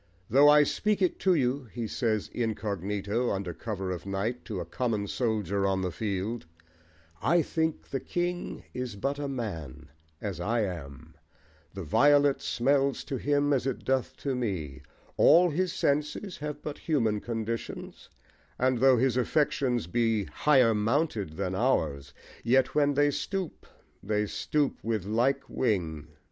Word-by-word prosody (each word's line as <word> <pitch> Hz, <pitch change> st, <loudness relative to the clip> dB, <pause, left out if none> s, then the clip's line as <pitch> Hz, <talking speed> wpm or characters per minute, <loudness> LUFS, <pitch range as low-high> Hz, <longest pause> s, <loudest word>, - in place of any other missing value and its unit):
"Though 140 Hz, +4 st, +7 dB
I 150 Hz, 0 st, +7 dB
speak 210 Hz, +8 st, 0 dB
it 185 Hz, -3 st, +1 dB
to 185 Hz, -2 st, +3 dB
you," 130 Hz, -1 st, 0 dB
he 115 Hz, 0 st, -5 dB
says 110 Hz, -3 st, -1 dB
incognito, 105 Hz, 0 st, -2 dB
under 95 Hz, -3 st, -2 dB
cover 95 Hz, -2 st, -4 dB
of 90 Hz, -, -5 dB
night, 100 Hz, +6 st, -2 dB
to 105 Hz, -6 st, -4 dB
a 85 Hz, -, -4 dB
common 110 Hz, +2 st, -1 dB
soldier 100 Hz, -4 st, 0 dB
on 95 Hz, -1 st, 0 dB
the 90 Hz, -, -1 dB
field, 105 Hz, +1 st, -3 dB, 0.7 s
"I 170 Hz, +2 st, +3 dB
think 160 Hz, 0 st, -2 dB
the 135 Hz, -, -2 dB
king 175 Hz, +5 st, -3 dB
is 125 Hz, -4 st, -4 dB
but 140 Hz, +8 st, -2 dB
a 145 Hz, -, -2 dB
man, 90 Hz, -, -5 dB, 0.3 s
as 100 Hz, -5 st, -4 dB
I 115 Hz, +6 st, 0 dB
am: 80 Hz, -9 st, -6 dB, 0.6 s
the 95 Hz, -, -5 dB
violet 145 Hz, -, +4 dB
smells 135 Hz, +2 st, +1 dB
to 135 Hz, -, -4 dB
him 145 Hz, +1 st, +1 dB
as 135 Hz, -1 st, 0 dB
it 135 Hz, -, -3 dB
doth 130 Hz, 0 st, 0 dB
to 140 Hz, -, +1 dB
me: 95 Hz, -, -3 dB, 0.4 s
all 175 Hz, +3 st, +6 dB
his 180 Hz, +3 st, 0 dB
senses 150 Hz, +3 st, -1 dB
have 150 Hz, 0 st, -5 dB
but 150 Hz, -, -5 dB
human 115 Hz, -10 st, +1 dB
conditions; 115 Hz, 0 st, -5 dB, 0.5 s
and 130 Hz, -1 st, +2 dB
though 130 Hz, 0 st, +6 dB
his 130 Hz, +1 st, +2 dB
affections 125 Hz, -, +1 dB
be 115 Hz, +3 st, +1 dB
higher 130 Hz, -3 st, +3 dB
mounted 110 Hz, -, 0 dB
than -, -, -2 dB
ours 70 Hz, 0 st, 0 dB, 0.3 s
yet 130 Hz, +2 st, +3 dB
when 145 Hz, -1 st, +2 dB
they 145 Hz, +1 st, +4 dB
stoop 190 Hz, +3 st, -4 dB, 0.3 s
they 105 Hz, +1 st, 0 dB
stoop 145 Hz, +7 st, -1 dB
with 110 Hz, -4 st, -1 dB
like 120 Hz, +6 st, +1 dB
wing." 85 Hz, -, -1 dB
120 Hz, 150 wpm, -28 LUFS, 100-145 Hz, 0.7 s, Though